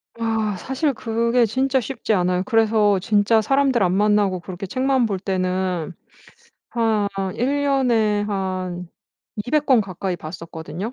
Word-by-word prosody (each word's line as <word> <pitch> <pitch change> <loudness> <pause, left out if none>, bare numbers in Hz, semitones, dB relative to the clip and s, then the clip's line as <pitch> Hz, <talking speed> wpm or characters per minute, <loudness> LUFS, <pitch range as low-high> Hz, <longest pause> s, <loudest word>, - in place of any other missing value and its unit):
아 225 -3 -1
사실 270 - -1
그게 235 +1 +1
진짜 265 +4 +1
쉽지 235 -2 -2
않아요. 180 -1 +1
그래서 215 -3 +3
진짜 210 +3 +3
사람들 270 -1 +2
안 180 0 +2
만나고 205 -2 +2
그렇게 185 +2 -7
책만 260 +4 +1
볼 195 -4 -2
때는 185 -2 -2 0.8
한 220 -3 +1 0.3
1 280 +4 0
년에 235 -7 +2
한 185 -3 -3 0.6
200 300 +3 +1
권 255 -5 +5
가까이 185 -1 -4
봤었거든요 165 +5 -7
210 Hz, 245 characters per minute, -21 LUFS, 185-240 Hz, 0.8 s, 권